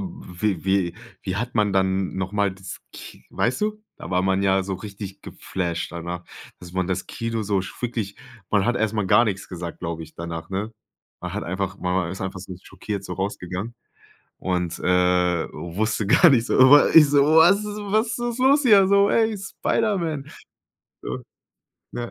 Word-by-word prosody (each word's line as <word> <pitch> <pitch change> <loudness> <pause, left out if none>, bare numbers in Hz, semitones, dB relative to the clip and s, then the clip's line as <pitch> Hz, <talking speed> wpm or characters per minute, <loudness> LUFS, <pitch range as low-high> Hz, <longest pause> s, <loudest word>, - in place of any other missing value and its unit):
wie 105 - -4
wie 95 -3 +1 0.3
wie 95 -1 -3
hat 120 +2 -3
man 105 -3 +2
dann 95 0 0
noch 95 +1 -3
mal 100 -2 +1
das 95 -1 -9
Ki - - -12
weißt 125 - -1
du? 215 0 -2
Da - - -9
war 90 0 +1
man 95 +1 +1
ja 95 -1 +3
so 95 0 -4
richtig 100 0 -8
geflasht 85 -3 -4
danach, 85 0 -6 0.3
dass 85 -1 -12
man 95 -1 -1
das 95 -1 -2
Kino 115 -1 -3
so 100 -1 0
f 90 - -6
wirklich 115 -5 -3 0.3
man 105 -3 +3
hat 120 +1 +1
erst 110 0 0
mal 105 -3 0
gar 120 +5 +5
nix 100 -2 -3
gesagt, 85 -2 -7
glaube 85 0 -4
ich, 80 0 -13
danach, 85 0 -6
ne? 100 +4 -3 0.5
Man - - -5
hat - - -3
einfach 95 +2 -3
ma 90 -1 -2
man 85 - -4
ist 95 - -7
einfach 95 0 -4
so 95 0 -8
schockiert 100 -2 -6
so 90 - -6
rausgegangen 95 +3 -4 0.6
und, 90 -2 -2
äh, 90 -1 +2
wusste 105 +4 -2
gar 170 - +6
nicht 120 -4 +3
so - - 0
Aber 130 +3 +7
ich 155 -3 +9
so: 140 0 +4
„Was 200 +6 +6
was 210 +2 -1
was 240 0 -1
ist 235 - -8
los 275 +3 +4
hier 205 -6 +6
so, 200 0 +5
ey, 220 -2 +2
Spiderman?“ 190 -6 -1 0.8
Ja. 60 +1 -4 0.8
Ja. 120 -1 -5
100 Hz, 185 wpm, -23 LUFS, 90-130 Hz, 0.8 s, ich